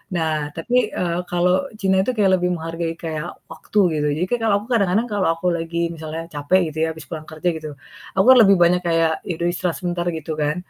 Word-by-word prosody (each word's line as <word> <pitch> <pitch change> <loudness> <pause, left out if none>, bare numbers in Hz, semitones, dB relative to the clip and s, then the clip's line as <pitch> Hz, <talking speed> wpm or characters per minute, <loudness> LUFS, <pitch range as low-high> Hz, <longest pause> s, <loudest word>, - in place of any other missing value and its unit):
Nah 160 -2 0 0.2
tapi, 240 +10 -2 0.2
eee, 175 -1 -1
kalau 175 +1 +2 0.3
Cina 190 -2 +2
itu 255 - 0
kayak 195 -3 +4
lebih 180 - 0
menghargai 165 0 -4
kayak 160 0 -3 0.2
waktu 210 - -2 0.2
gitu, 150 0 0
jadi 180 - +1
kayak 245 -1 -1
kalau 210 -2 +3
aku 215 - -12
kadang-kadang 210 +1 +2
kalau 200 -4 +1
aku 165 +2 -10
lagi 165 0 -5 0.2
misalnya 160 +1 -6
capek 145 +6 +2
gitu 155 - -11
ya 160 - +2
habis 160 -3 -10
pulang 155 -2 -6
kerja 155 +3 -4
gitu. 155 -1 -7 0.5
Aku 190 - +3
kan 260 - +9
lebih 200 0 +6
banyak 180 +1 +3
kayak 165 -1 +2 0.2
ya 180 - -1
udah 170 - 0
istirahat 175 -1 -2
sebentar 175 -1 -2
gitu 160 +1 -6
kan, 150 +1 +1
170 Hz, 220 wpm, -21 LUFS, 160-190 Hz, 0.5 s, kan